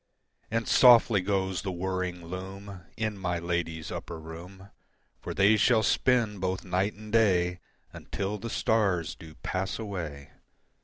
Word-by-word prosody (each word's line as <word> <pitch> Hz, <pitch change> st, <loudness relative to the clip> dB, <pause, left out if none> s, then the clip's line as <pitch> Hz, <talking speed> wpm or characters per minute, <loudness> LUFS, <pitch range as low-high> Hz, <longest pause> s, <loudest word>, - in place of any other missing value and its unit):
And 115 Hz, +1 st, -1 dB
softly 120 Hz, -5 st, +6 dB
goes 95 Hz, -1 st, -1 dB
the 95 Hz, -, -3 dB
whirring 90 Hz, -1 st, -3 dB
loom 95 Hz, +2 st, -7 dB, 0.2 s
In 110 Hz, -2 st, -2 dB
my 90 Hz, -2 st, -1 dB
ladies' 85 Hz, -2 st, -3 dB
upper 85 Hz, -1 st, -6 dB
room, 90 Hz, +5 st, -11 dB, 0.5 s
For -, -, -6 dB
they 100 Hz, +3 st, +5 dB
shall 110 Hz, +2 st, +4 dB
spin 115 Hz, -3 st, +2 dB
both 95 Hz, +1 st, -2 dB
night 95 Hz, +3 st, 0 dB
and 105 Hz, +1 st, -11 dB
day 90 Hz, -5 st, +3 dB, 0.3 s
Until 100 Hz, +2 st, -4 dB
the 115 Hz, -, -5 dB
stars 100 Hz, -8 st, +1 dB
do 80 Hz, -4 st, -13 dB
pass 95 Hz, +1 st, -2 dB
away. 85 Hz, -10 st, -6 dB
95 Hz, 140 wpm, -28 LUFS, 90-105 Hz, 0.5 s, softly